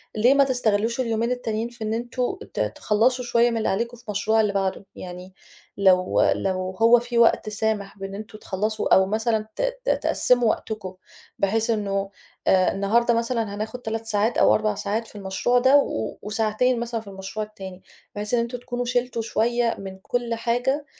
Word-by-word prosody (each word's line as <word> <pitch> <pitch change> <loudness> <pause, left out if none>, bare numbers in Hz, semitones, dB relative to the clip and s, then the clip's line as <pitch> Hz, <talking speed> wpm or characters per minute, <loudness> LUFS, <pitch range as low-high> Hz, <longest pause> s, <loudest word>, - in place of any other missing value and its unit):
ليه 240 +5 +5
ما 280 0 +5
تستغلّوش 235 -3 +1
اليومين 230 0 0
التانيين 230 -2 -2
في 240 -2 -9
إن 215 +1 -1
أنتم 240 +2 -2 0.2
ت - - -4
تخلّصوا 220 - +1
شوية 240 0 +3
من 230 - -1
اللي 220 - 0
عليكم 235 +4 -2
في 235 - -19
المشروع 215 +2 +2
اللي 205 -2 0
بعده؟ 195 0 -1
يعني 180 +1 -9 0.4
لو 185 -2 +3
لو 185 -1 -2
هو 235 +1 +7
في 240 0 -4
وقت 230 -2 +4
سامح 210 -1 -2
بأن 195 0 -6
أنتم 215 +1 -8
تخلصوا 215 +2 -1
أو 190 - +5
مثلًا 220 +1 0
ت - - -3 0.2
ت - - 0
تقسّموا 245 -3 +2
وقتكم 210 -5 -3 0.5
بحيث 220 +3 +1
إنه 200 -3 -1 0.4
آآ 185 -1 +4
النهاردة 230 +5 +2
مثلًا 230 -3 -1
هناخد 220 +4 -5
3 225 0 -4
ساعات 220 +2 +1
أو - - +5
4 215 -1 0
ساعات 215 +3 -2
في - - -16
المشروع 205 +5 +1
ده 260 +3 +5
و 110 - -1
وساعتين 220 +4 0
مثلًا 235 -1 -3
في 215 - -18
المشروع 195 +2 -5
التاني، 190 -3 -10 0.3
بحيث 210 +3 -4
إن 240 - +4
أنتم 235 +1 -2
تكونوا 245 0 -4
شِلتوا 245 -1 -1
شوية 230 +1 0
من 190 -1 -8
كل 235 +3 -2
حاجة 245 +5 0
220 Hz, 180 wpm, -24 LUFS, 200-240 Hz, 0.5 s, هو